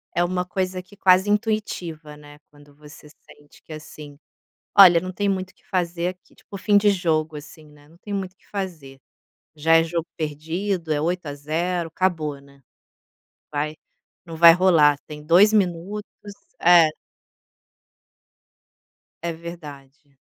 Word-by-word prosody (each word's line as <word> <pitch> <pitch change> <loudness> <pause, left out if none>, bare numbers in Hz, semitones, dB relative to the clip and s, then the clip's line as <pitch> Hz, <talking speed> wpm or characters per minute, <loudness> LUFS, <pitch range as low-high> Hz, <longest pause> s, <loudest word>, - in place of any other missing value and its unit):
É 175 - +2
uma 180 0 -2
coisa 185 0 -3
que 205 +2 -20
quase 190 +2 +4
intuitiva, 185 -8 -3
né, 145 0 -15
quando 145 -1 -20
você 150 0 -15
sente 145 0 -21
que, - - -16
assim: 150 -1 -11 0.6
"Olha, 180 -4 +9
não 185 +1 -6
tem 200 +2 -2
muito 190 -1 -2
que - - -32
fazer 175 -1 -2
aqui". 185 -1 -14
Tipo - - -13
o - - -4
fim 205 +1 +3
de 205 0 +4
jogo, 160 -4 -1
assim, 150 +1 -12
né, 150 -1 -20
não 165 - -21
tem 205 +3 -8
muito 190 -2 -4
que - - -31
fazer, 160 -9 -7 0.6
já 165 +2 +4
é 165 - +5
jogo 165 0 -3
perdido, 165 +3 -3
é 145 - 0
8 175 +3 -2
a 145 - -5
0, 165 +4 -3
acabou, 160 -5 -2
né, 140 0 -21 0.9
vai 150 +1 -3 0.5
não 165 -1 -9
vai 170 0 +9
rolar, 165 -5 +4
tem 150 -1 -10
2 180 +7 +5
minutos, 195 +1 -1 0.6
é. 170 -2 +7 2.4
É 170 - -2
verdade. 150 -4 -12
170 Hz, 150 wpm, -22 LUFS, 150-185 Hz, 2.4 s, Olha